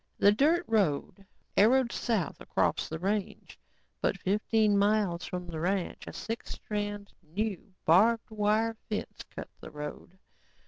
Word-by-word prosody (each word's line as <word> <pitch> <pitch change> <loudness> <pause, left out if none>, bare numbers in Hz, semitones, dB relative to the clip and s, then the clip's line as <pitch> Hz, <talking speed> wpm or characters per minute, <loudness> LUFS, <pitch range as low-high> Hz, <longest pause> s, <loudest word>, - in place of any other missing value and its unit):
The 205 - +6
dirt 310 +10 +3
road 195 -2 0 0.3
arrowed 235 +4 +5
south 215 -9 -1
across - - 0
the 160 - -3
range 200 +3 -3 0.4
but - - +1
fifteen 210 +1 +2
miles 200 -5 +2
from 180 +2 -4
the 165 -2 -6
ranch, 185 +2 -1
a - - -7
six 225 +1 -5
strand, 205 -1 -4
new, 195 +4 -4
barbed 220 +8 +4
wire 215 +2 +1
fence 210 - -4
cut - - -8
the - - -9
road. 150 +5 -8
205 Hz, 135 wpm, -30 LUFS, 180-220 Hz, 0.4 s, The